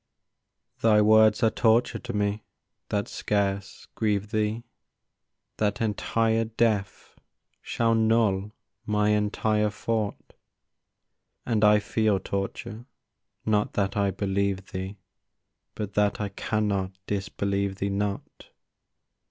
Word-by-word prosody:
Thy 110 -2 +5
words 110 +1 +5
are 110 - +4
torture 115 +1 +2
to 125 - -6
me, 105 0 -1 0.5
that 105 0 -1
scarce 100 -2 -2
grieve 105 -1 -1
thee— 110 +1 -1 0.9
That 105 -1 0
entire 115 +1 +1
death 110 -3 -1 0.4
shall 115 -1 0
null 110 -3 +2 0.3
my 105 -2 +1
entire 105 0 +1
thought; 105 0 -3 1.1
And 110 -3 +1
I 105 0 +7
feel 105 -1 +1
torture, 100 +4 -5 0.6
not 105 -1 +1
that 100 -1 0
I 100 -1 +2
believe 95 0 -1
thee, 95 +1 -5 0.8
But 105 -2 -5
that 105 0 +1
I 105 -1 -2
cannot 100 -2 -1
disbelieve 100 0 -2
thee 100 +1 -2
not. 100 0 -4
105 Hz, 105 wpm, -26 LUFS, 100-110 Hz, 1.1 s, I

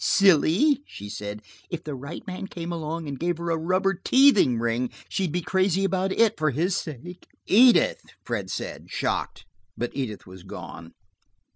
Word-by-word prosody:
"Silly," 195 - +4
she 105 +1 -9
said. 105 0 -6 0.3
"If 170 -1 -5
the 150 - -5
right 140 +4 -8
man 185 +1 -6
came 170 -2 -6
along 165 -1 -4
and 140 -2 -5
gave 175 0 -1
her 170 0 -3
a - - +2
rubber 185 +4 +1
teething 215 - +4
ring, 120 +2 0 0.2
she'd 185 -5 -1
be 175 +1 -2
crazy 190 +1 +1
about 190 0 0
it 225 0 +2
for 155 0 +2
his 165 +8 0
sake." 165 +5 -7 0.2
"Edith!" 240 +4 +5 0.2
Fred - - -3
said, - - -5
shocked. - - -2 0.3
But 120 - -2
Edith 125 -7 -4
had 90 -1 -12
gone. 85 0 -9
170 Hz, 165 wpm, -25 LUFS, 130-190 Hz, 0.3 s, Edith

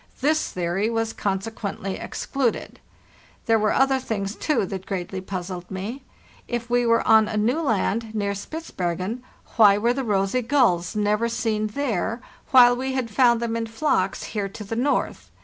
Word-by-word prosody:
This 310 +4 +1
theory 180 +4 -1
was 225 -1 -1
consequently 200 -1 -3
excluded. 260 -4 -3 0.7
There 225 -1 +3
were 215 0 +2
other 270 0 +3
things, 205 -4 -3
too, 300 -10 0
that 190 0 -6
greatly 190 -1 -4
puzzled 180 -1 -6
me. 200 +8 -5 0.5
If 240 0 -4
we 245 0 +3
were 230 0 +2
on 220 -1 +6
a 215 - -3
new 240 +9 +1
land, 225 -3 -1
near 200 -1 0
Spitzbergen, 200 - -4 0.4
why 205 -3 +7
were 235 +3 +2
the 270 +1 -2
rosy 200 +2 +1
gulls 225 -10 +2
never 210 +2 +1
seen 220 -2 -1
there, 230 -2 -2 0.3
while 245 -2 +7
we 260 +1 -3
had 255 -4 -2
found 235 +1 +4
them 230 -1 -1
in 230 0 -2
flocks 220 - 0
here 205 -2 -2
to 210 - -8
the 210 +3 -5
north? 270 +5 -1
220 Hz, 165 wpm, -24 LUFS, 195-245 Hz, 0.7 s, why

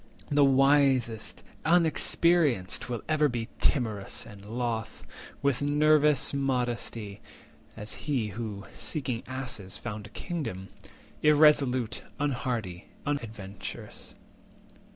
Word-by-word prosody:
The 145 0 +5
wisest, 135 -4 +3 0.2
unexperienced, 160 - +2
will 120 -3 -3
be - - -28
ever 155 -1 +3
240 120 -2 -3
Timorous, 110 -7 0
and 100 -3 -12
loth, 115 +1 -3 0.4
with 140 -2 +2
novice 150 -1 +4
modesty 120 -6 -2 0.6
(As 105 -1 -3 0.2
he 120 -7 +1
who, 105 -1 -6
seeking 130 -6 -3
asses, 125 -8 -5
found 105 -2 -6
a - - -16
kingdom) 115 - -5 0.5
Irresolute, 145 -6 +4 0.2
unhardy, 120 -10 -2 0.2
unadventrous. 110 -9 -6
125 Hz, 95 wpm, -28 LUFS, 110-145 Hz, 0.6 s, The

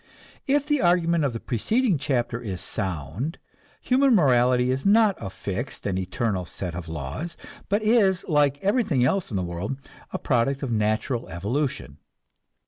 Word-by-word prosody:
If 285 +1 +2
the 295 -2 +1
argument 170 -2 +3
of 135 - +1
the 115 - -4
preceding 195 - +1
chapter 120 -4 -1
is 95 -6 -5
sound, 95 - -3 0.4
human 265 -1 +4
morality 125 - +4
is 130 +1 -2
not 210 0 +5
a - - -5
fixed 100 +6 -5
and 95 -2 0
eternal 95 +1 -1
set 90 0 -6
of 85 -1 -6
laws, 80 - -5 0.3
but 205 +2 +1
is, 210 -5 +3
like 145 -3 +3
everything 195 - +2
else 190 +7 0
in 105 - -2
the 95 - -1
world, 90 +9 -4 0.3
a - - -2
product 135 +2 0
of 130 - -2
natural 110 +3 0
evolution. 105 - -3
130 Hz, 155 wpm, -25 LUFS, -, 0.4 s, not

